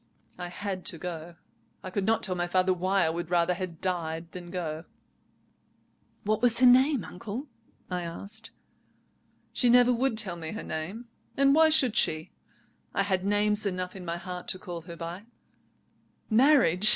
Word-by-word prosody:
I 180 - -4
had 190 +1 -5
to 165 - 0
go. 170 0 -7 0.5
I 185 - -6
could 195 +1 -2
not 225 0 +2
tell 190 - +1
my 175 -1 -2
father 185 +1 +2
why 185 0 +1
I 160 - +1
would 170 0 -5
rather 175 0 +2
had 180 -2 -6
died 165 -2 -3
than 175 -1 -9
go." 165 -3 -4 1.4
"What 215 +1 0
was 240 -2 +4
her 255 - +5
name, 260 0 +5
uncle?" 215 +8 -7 0.4
I 180 -1 -3
asked. 200 +6 -6 1.0
"She 245 - +2
never 245 +1 +6
would 245 -1 0
tell 190 -6 -1
me 160 +1 -5
her 220 - -5
name, 180 +10 -5 0.3
and 275 0 +5
why 320 +1 +6
should 260 -7 +4
she? 155 -7 0 0.6
I 195 - +2
had 190 -2 -1
names 205 +1 +2
enough 185 -1 -3
in 190 - -8
my 170 -1 -3
heart 180 0 -7
to - - +6
call 175 -3 -7
her 170 - -6
by. 175 +6 -7 1.0
Marriage? 220 - +5
185 Hz, 170 wpm, -28 LUFS, 175-220 Hz, 1.4 s, never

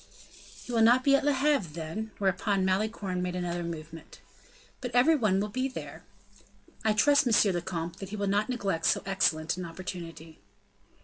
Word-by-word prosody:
"He - - -8
will 230 -1 +2
not 240 +3 +5
be 275 0 +5
at 275 - +1
Le 290 - +3
Havre, 270 - +1
then?" 165 +7 -5
Whereupon 195 0 0
Malicorne 190 -1 -1
made 180 0 -3
another 175 -1 -2
movement. 165 -1 -8 0.6
"But 250 - -3
every 265 +7 +5
one 210 -8 +2
will 205 - 0
be 255 +5 -2
there." 260 - -8 0.8
"I 220 -1 +3
trust, 285 +5 +4
monsieur 215 -3 +4
le 175 -1 -2
comte, 170 0 -5
that 195 - -7
he 210 - -5
will 200 -1 -2
not 205 +4 +1
neglect 200 -9 -1
so - - +2
excellent 165 -4 0
an 180 - -4
opportunity." 165 -2 -8
195 Hz, 180 wpm, -28 LUFS, 175-230 Hz, 0.8 s, not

